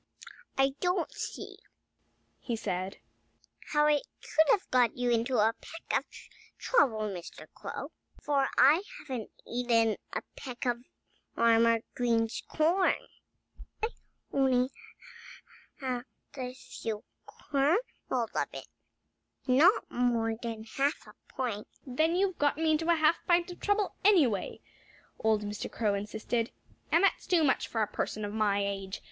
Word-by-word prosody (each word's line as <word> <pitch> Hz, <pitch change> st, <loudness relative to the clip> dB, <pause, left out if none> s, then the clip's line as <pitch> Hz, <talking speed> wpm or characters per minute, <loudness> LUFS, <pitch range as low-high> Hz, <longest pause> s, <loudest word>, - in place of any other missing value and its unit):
"I 270 Hz, 0 st, +5 dB
don't 360 Hz, -1 st, 0 dB
see," -, -, -6 dB, 0.8 s
he 235 Hz, -, -3 dB
said, 190 Hz, -3 st, -3 dB, 0.7 s
"how 295 Hz, 0 st, +4 dB
I 300 Hz, -1 st, +4 dB, 0.2 s
could 315 Hz, -1 st, +2 dB
have 400 Hz, -, +3 dB
got 250 Hz, -2 st, +3 dB
you 245 Hz, -1 st, +1 dB
into 235 Hz, +2 st, +1 dB
a 220 Hz, +1 st, +4 dB
peck 330 Hz, -, -5 dB
of -, -, -17 dB, 0.5 s
trouble, 260 Hz, -, +2 dB
Mr. 190 Hz, -5 st, -6 dB
Crow, -, -, -6 dB, 0.3 s
for 280 Hz, -2 st, +1 dB
I 290 Hz, +7 st, +7 dB, 0.2 s
haven't 255 Hz, -, -5 dB, 0.2 s
eaten 230 Hz, -2 st, +2 dB
a -, -, -3 dB
peck 250 Hz, -2 st, -6 dB
of 245 Hz, 0 st, -1 dB, 0.5 s
Farmer 230 Hz, 0 st, +4 dB
Green's 230 Hz, -2 st, +1 dB
corn. 340 Hz, +5 st, +3 dB, 0.9 s
I've 445 Hz, -, +1 dB, 0.4 s
had -, -, -1 dB
only 260 Hz, -1 st, +3 dB, 1.1 s
a 255 Hz, 0 st, -5 dB
few 220 Hz, -4 st, -6 dB, 0.2 s
kernels 290 Hz, -, +1 dB, 0.3 s
of 240 Hz, -4 st, 0 dB, 0.2 s
it -, -, -7 dB, 0.8 s
not 300 Hz, -, +4 dB
more 235 Hz, -2 st, +1 dB
than 225 Hz, -1 st, -5 dB
half 275 Hz, +7 st, -1 dB
a -, -, -14 dB
pint." 230 Hz, -5 st, -3 dB, 0.2 s
"Then 315 Hz, +6 st, +1 dB
you've 375 Hz, -1 st, +1 dB
got 290 Hz, 0 st, +2 dB
me 320 Hz, 0 st, +2 dB
into 320 Hz, +2 st, +1 dB
a 340 Hz, -, +6 dB
half 315 Hz, +1 st, +4 dB
pint 345 Hz, 0 st, +3 dB
of 350 Hz, -, -10 dB
trouble, 410 Hz, -1 st, +1 dB
anyway," 305 Hz, -, +3 dB, 0.6 s
old 220 Hz, -1 st, +2 dB
Mr. 205 Hz, 0 st, -5 dB
Crow 215 Hz, -3 st, 0 dB
insisted. 220 Hz, +4 st, -2 dB, 0.4 s
"And 340 Hz, -, +4 dB
that's 395 Hz, -, +2 dB
too 350 Hz, -3 st, +4 dB
much, 270 Hz, -, +2 dB
for 225 Hz, -2 st, 0 dB
a -, -, -1 dB
person 215 Hz, +1 st, -3 dB
of 205 Hz, -, -5 dB
my 205 Hz, -2 st, +2 dB
age. 195 Hz, -1 st, -4 dB
250 Hz, 140 wpm, -30 LUFS, 225-310 Hz, 1.1 s, I